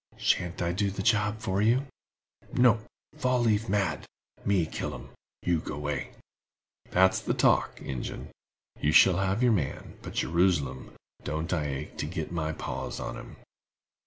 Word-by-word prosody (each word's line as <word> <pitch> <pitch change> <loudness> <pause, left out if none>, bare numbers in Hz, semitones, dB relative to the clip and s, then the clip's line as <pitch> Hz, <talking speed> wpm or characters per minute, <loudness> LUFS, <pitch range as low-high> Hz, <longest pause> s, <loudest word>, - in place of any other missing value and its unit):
"Shan't 90 0 0
I 85 - +1
do 100 +3 0
the 95 0 -4
job 105 -1 +2
for 95 0 0
ye?" 120 +5 +3 0.7
"No—Fall 125 +2 +1
leaf 110 -1 +2
mad. 100 -3 0 0.4
Me 95 -4 +2
kill - - -4
'em—you 85 -2 -4
go 75 - -6
way." 75 -2 -3 0.8
"That's 95 +1 +4
the - - -1
talk, - - +3
Ingen. 65 -2 -5 0.5
You 75 - +1
shall 90 +2 +7
have 95 +5 +1
your 125 - +5
man; 80 -10 -3
but, - - -8
Jerusalem, 80 -7 +1 0.3
don't 80 +3 -2
I 80 -4 0
ache 70 -2 -5
to - - -1
git 80 -1 -4
my 80 -2 -1
paws - - -5
on - - -4
him!" - - -10
95 Hz, 150 wpm, -28 LUFS, 80-105 Hz, 0.8 s, shall